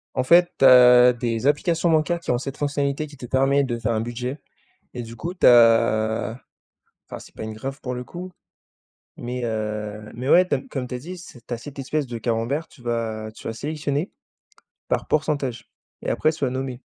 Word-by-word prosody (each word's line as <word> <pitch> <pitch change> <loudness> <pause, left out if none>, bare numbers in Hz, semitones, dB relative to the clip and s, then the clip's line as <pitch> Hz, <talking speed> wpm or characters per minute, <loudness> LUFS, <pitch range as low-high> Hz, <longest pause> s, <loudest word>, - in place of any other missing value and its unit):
En 130 - +1
fait, 175 +6 +5
tu - - +4
as 125 -1 +8
des 115 -1 -3
applications 165 +3 +1
bancaires 160 +2 +2
qui - - -3
ont 125 - +2
cette 135 +1 -6
fonctionnalité 145 0 -1
qui 145 - -14
te 125 - -8
permet 135 +2 +2
de 120 -3 -2
faire 115 - -1
un 110 - 0
budget. 125 +4 -4 0.6
Et 125 - -4
du 115 0 -10
coup, 170 +6 -5
tu 185 - +2
as 115 -1 +4 0.7
enfin, - - -8
c'est - - -15
pas - - -8
une 110 0 -5
graphe, 135 +5 -6
pour 125 -1 -4
le 125 0 -5
coup, 180 +8 -8 0.8
mais, 125 +1 -5
heu, 105 -1 -4
mais, 125 +3 -5
ouais, 180 +4 +6
tu - - +2
as 135 - -1
comme 130 -2 -3
tu 125 - -7
as - - -3
dit, 175 +8 -8
c'est 130 -9 -13
tu 120 - -3
as - - -6
cette 140 +5 -11
espèce 140 +2 -2
de 120 -2 -6
camembert, 120 +7 -1
tu 130 - -19
vas 115 -2 -3
tu - - -12
vas - - -2
sélectionner 150 - -3 0.8
par - - -1
pourcentage, 135 -6 -1 0.3
et - - -3
après, 155 - +2
tu 160 -1 -7
vas 125 - -1
nommer. 130 -1 -4
125 Hz, 210 wpm, -23 LUFS, 115-145 Hz, 0.8 s, as